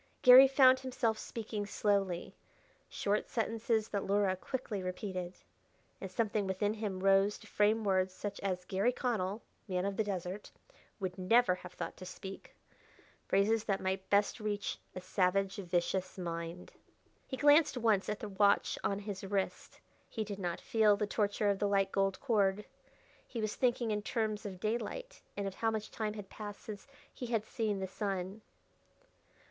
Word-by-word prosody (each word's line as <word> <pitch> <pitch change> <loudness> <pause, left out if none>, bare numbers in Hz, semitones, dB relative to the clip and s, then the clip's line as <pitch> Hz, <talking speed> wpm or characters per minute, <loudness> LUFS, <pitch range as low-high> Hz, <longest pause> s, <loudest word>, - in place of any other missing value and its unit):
Garry 255 +2 +11
found 260 -1 +6
himself 240 -4 -1
speaking 220 -2 -4
slowly 195 -4 0 0.5
short 205 +1 -1
sentences 225 -1 0
that 200 - -1
Luhra 200 -1 +2
quickly 215 0 -4
repeated. 185 -1 -4 0.7
And 190 - -5
something 210 +1 0
within 205 +2 0
him 210 -4 -4
rose 195 +1 +4
to - - -16
frame 215 +2 +2
words 190 -2 +2
such 200 +2 -6
as 185 -2 -2
Garry 195 +6 +1
Connell, 220 -5 -2 0.2
man 185 -1 -1
of 200 -1 -2
the 220 - +2
desert, 190 0 -4 0.5
would 185 -1 -4
never 225 +2 +4
have 180 0 -9
thought - - -5
to 185 - -9
speak 190 +1 -9 0.7
phrases 215 +3 +2
that 195 -2 +1 0.3
best 205 +3 +2
might - - -9
reach 205 -1 -2 0.2
a 185 - -5
savage, 195 +2 +1
vicious 185 0 -1
mind. 170 0 -5 0.6
He 265 - -4
glanced 290 +1 +5
once 220 -5 +2
at 210 0 -3
the 215 - -5
watch 200 +1 +2
on 195 - 0
his 200 -1 -6
wrist. 195 0 -3 0.3
He 220 - -3
did 205 -1 -6
not 175 -3 -2
feel 215 -2 +3
the 210 - 0
torture 205 0 +1
of 195 - -2
the 205 - +1
tight 195 -1 +2
gold 195 -1 +1
cord. 210 -5 +1 0.6
He 235 - -5
was 215 -1 -1
thinking 240 -2 +1
in 210 0 0
terms 215 -2 -2
of 185 -2 -8
daylight, - - -3 0.2
and 200 - -2
of 195 - -4
how 225 +3 0
much 220 -1 -3
time 215 -1 -3
had 205 -2 -7
passed 205 0 -8
since 205 0 -8 0.3
he 245 - -6
had 225 -2 0
seen 215 -3 -1
the 190 - -2
sun.... 195 +1 -3
205 Hz, 165 wpm, -33 LUFS, 190-220 Hz, 0.7 s, Garry